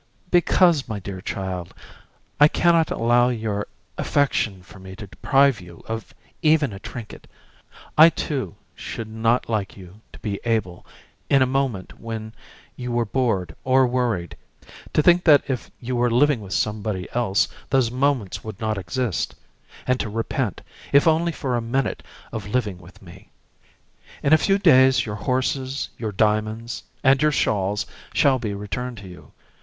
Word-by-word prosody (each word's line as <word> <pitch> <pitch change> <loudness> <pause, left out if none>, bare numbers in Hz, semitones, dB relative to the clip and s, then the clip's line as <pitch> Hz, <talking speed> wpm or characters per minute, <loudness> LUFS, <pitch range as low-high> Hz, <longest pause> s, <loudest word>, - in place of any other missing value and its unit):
"Because, 175 -5 +3
my 105 -2 -3
dear 95 -1 -7
child, 95 -4 -5 0.6
I 145 - +9
can 170 +2 +3
not 165 -1 +3
allow 120 +1 +3
your 110 -4 -2 0.3
affection 110 -9 0
for 95 - -15
me 95 0 -10
to 105 0 -8
deprive 135 +3 +2
you 85 -1 -13
of 115 0 -5 0.3
even 155 - +3
a 95 - -8
trinket. 115 +1 -9 0.7
I 160 +2 +9
too 135 - -3 0.2
should 115 - -6
not 115 +2 0
like 105 -4 -2
you 95 +2 -13
to - - -13
be 100 -2 -4
able, 110 -7 -2 0.4
in 135 -1 +5
a - - +3
moment 130 -7 -2
when 110 -1 -6 0.4
you 125 -1 -5
were 120 0 +1
bored 105 -8 -1
or 130 0 +4
worried, 120 -9 -1 0.6
to 150 - +2
think 175 +1 +5
that 150 -4 +7
if 130 -4 -3
you 125 +1 -3
were 120 0 +2
living 125 +1 +3
with 100 -1 -7
somebody 105 -4 -2
else 115 -5 +2 0.2
those 130 -4 +2
moments 130 -6 0
would 110 -3 -8
not 110 -2 -1
exist; 95 +2 -2 0.5
and 125 0 +1
to - - -2
repent, 115 0 -2 0.3
if 140 +3 +5
only 165 +2 +3
for 135 -5 -2
a 120 - 0
minute, 130 +4 -1 0.3
of 105 -2 -5
living 105 -5 -1
with 90 +2 -16
me. 85 -2 -14 0.9
In 140 - +4
a - - +8
few 195 +4 +2
days 130 -8 +5
your 105 - -4
horses, 130 +4 -1
your 110 -3 -3
diamonds, 110 +3 0 0.2
and 135 0 +4
your 150 0 +4
shawls 105 -5 0 0.3
shall 135 -4 +4
be 105 -4 -3
returned 120 +5 -5
to 100 -2 -10
you. 90 -1 -13
115 Hz, 160 wpm, -23 LUFS, 105-135 Hz, 0.9 s, I